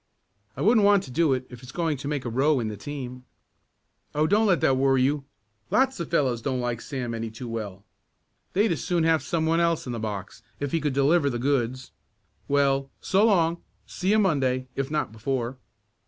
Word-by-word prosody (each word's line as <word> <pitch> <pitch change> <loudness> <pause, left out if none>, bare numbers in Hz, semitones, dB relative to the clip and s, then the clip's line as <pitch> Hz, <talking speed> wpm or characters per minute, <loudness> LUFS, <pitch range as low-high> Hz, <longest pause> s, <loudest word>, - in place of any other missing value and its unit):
"I - - -4
wouldn't 220 0 +4
want 200 -1 +5
to 130 - -10
do 160 +2 +2
it, 130 -1 0
if 125 -1 -10
it's 125 0 -10
going 165 -3 -1
to 135 - -6
make 145 -3 -2
a - - -1
row 135 +4 +2
in 110 -2 -2
the 105 - -5
team." 125 +1 -7 0.9
"Oh, 150 +1 +3
don't 210 +6 +3
let 185 -4 +3
that 135 - +3
worry 135 -1 +3
you. 140 +1 0 0.4
Lots 265 -3 +2
of 170 - -3
the - - -19
fellows 130 -8 +1
don't 130 0 -1
like 120 -1 -2
Sam 125 -5 -4
any 115 0 -3
too 115 +3 -8
well. 105 -4 -5 0.7
They'd 205 +1 +3
as 165 - -2
soon 175 -2 +1
have 160 -1 +3
some 160 -2 -1
one 165 +1 +2
else 170 -1 +1
in 125 - -4
the 115 - -4
box 105 -3 -5 0.2
if 145 -1 -3
he 165 - 0
could 145 -2 0
deliver 140 +2 +3
the 120 - -2
goods. 130 -1 -1 0.6
Well, 140 -1 +2
so 195 +2 +2
long; 170 -5 +2 0.2
see 185 - -3
you 215 - +5
Monday, 135 -10 +1
if 135 0 -2
not 150 -7 -1
before." 120 +2 -3
140 Hz, 215 wpm, -26 LUFS, 125-165 Hz, 0.9 s, want